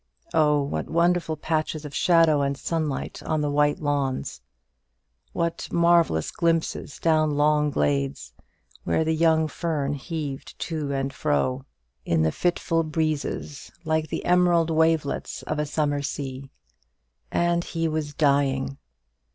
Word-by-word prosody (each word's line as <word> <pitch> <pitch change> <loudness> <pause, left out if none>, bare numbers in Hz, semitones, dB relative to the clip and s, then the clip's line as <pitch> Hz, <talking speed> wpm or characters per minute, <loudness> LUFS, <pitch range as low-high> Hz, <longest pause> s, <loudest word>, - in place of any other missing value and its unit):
Oh, 150 -2 +3
what 140 - -3
wonderful 170 -1 +1
patches 155 0 -2
of 145 - -8
shadow 165 -4 +4
and 140 0 -1
sunlight 155 -3 -3
on 155 -1 -1
the 145 -1 0
wide 145 0 +2
lawns! 140 -3 -2 0.9
what 170 0 -2
marvellous 170 - +3
glimpses 165 -3 -1
down 155 -2 +2
long 150 0 +3
glades, 70 - -1 0.5
where 85 - +1
the 160 0 +1
young 160 0 +3
fern 150 -3 -2
heaved 145 -1 -5
to 155 -4 -3
and 135 0 -2
fro 130 -2 0 0.4
in 80 +2 +1
the 80 - +2
fitful 165 - 0
breezes 155 -2 -3
like 160 0 0
the - - -4
emerald 175 -2 +3
wavelets 160 -2 0
of 155 - -3
a 150 - -1
summer 145 -1 0
sea! 135 -1 -5 0.8
And 170 0 +1
he 165 -1 -2
was 155 -2 -3
dying! 140 -2 +1
150 Hz, 130 wpm, -25 LUFS, 140-165 Hz, 0.9 s, shadow